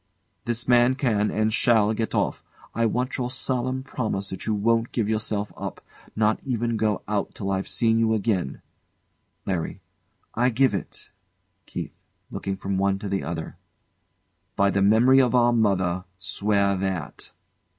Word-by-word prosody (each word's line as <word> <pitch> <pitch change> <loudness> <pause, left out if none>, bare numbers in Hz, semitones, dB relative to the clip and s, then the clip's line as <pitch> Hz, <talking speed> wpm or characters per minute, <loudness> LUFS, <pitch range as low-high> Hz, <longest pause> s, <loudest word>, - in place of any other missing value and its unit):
This 120 0 -1
man 120 +1 +5
can 110 -6 +1
and 110 0 0
shall 110 -2 +3
get 110 0 -2
off. - - 0 0.3
I 115 0 +2
want 125 +4 -1
your 125 -1 -1
solemn 130 0 -2
promise 105 -7 -3
that 95 0 -5
you 110 - +1
won't 115 +3 +1
give 115 -4 -1
yourself 105 -1 -1
up, - - -6 0.4
nor 110 0 +2
even 120 -3 -1
go 110 -2 0
out 105 -1 -2
till 100 -1 -3
I've 95 0 -1
seen 115 -1 +2
you 110 -1 +2
again. 100 - -1 0.8
LARRY. 90 -4 -2 0.5
I 125 +2 +2
give 130 0 +2
it. 100 - -6 0.6
KEITH. - - -5 0.4
[Looking 95 -1 -4
from 95 0 -2
one 100 0 +2
to 100 - -6
the 95 0 -1
other] 80 +2 -5 1.0
By 100 0 +3
the 100 - +1
memory 115 +7 +6
of 125 -1 +2
our 120 -1 +4
mother, 95 -5 +1
swear 100 +1 +1
that. 95 -7 -4
110 Hz, 155 wpm, -25 LUFS, 100-120 Hz, 1.0 s, memory